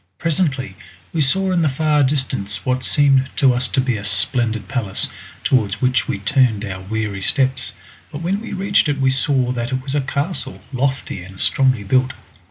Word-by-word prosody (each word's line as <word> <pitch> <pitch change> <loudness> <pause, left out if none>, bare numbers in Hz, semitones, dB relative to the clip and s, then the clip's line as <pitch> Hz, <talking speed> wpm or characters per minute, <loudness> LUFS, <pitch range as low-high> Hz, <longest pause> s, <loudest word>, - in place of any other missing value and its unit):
Presently 150 -5 0 0.4
we 165 - +1
saw 190 +7 +2
in 180 -2 +2
the 155 - +3
far 150 +2 +1
distance 130 -7 -1
what 130 0 0
seemed 135 -2 +3
to 135 -3 +4
us 125 +1 0
to - - -1
be 130 -3 0
a 100 - -7
splendid 110 +2 +1
palace, 105 -7 0 0.3
towards 110 -5 +1
which 130 +1 +1
we - - -1
turned 110 0 +2
our 95 -2 -6
weary 105 0 -3
steps, 130 +4 0 0.4
but 145 +3 -6
when 195 +4 -1
we 230 - -7
reached 195 -4 +2
it 145 -1 -1
we 135 -1 +3
saw 130 -1 +1
that 120 -1 -3
it 130 0 -2
was 135 0 -4
a 145 - +1
castle, 140 - -3
lofty, 130 -6 -2
and 95 +1 -12
strongly 130 -5 +2
built. 130 +5 +1
130 Hz, 185 wpm, -19 LUFS, 110-140 Hz, 0.4 s, to